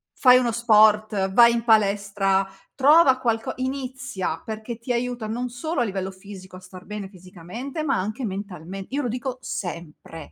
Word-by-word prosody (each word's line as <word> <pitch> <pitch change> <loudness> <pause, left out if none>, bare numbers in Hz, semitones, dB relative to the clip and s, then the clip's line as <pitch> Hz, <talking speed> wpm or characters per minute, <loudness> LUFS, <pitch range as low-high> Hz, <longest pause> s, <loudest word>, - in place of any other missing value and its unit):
Fai 250 -1 +6
uno 245 -2 +1
sport, 215 -3 +3
vai 235 +3 +7
in 235 0 -1
palestra, 200 -3 +2 0.3
trova 280 0 +5
qualco 230 -3 -1
inizia 260 -9 -4
perché 220 +1 -6
ti 245 +2 -3
aiuta 245 -2 -3
non 245 +3 -3
solo 280 +4 -3
a - - +3
livello 190 -3 -3
fisico 190 -1 -12
a - - -9
star 185 0 -13
bene 210 -2 -6
fisicamente, 190 - -8
ma 310 - +1
anche 215 +7 -4
mentalme 195 -2 -6
io 280 +3 -2
lo 250 - -2
dico 250 +2 -4
sempre, 165 - -7
215 Hz, 165 wpm, -23 LUFS, 190-250 Hz, 0.3 s, vai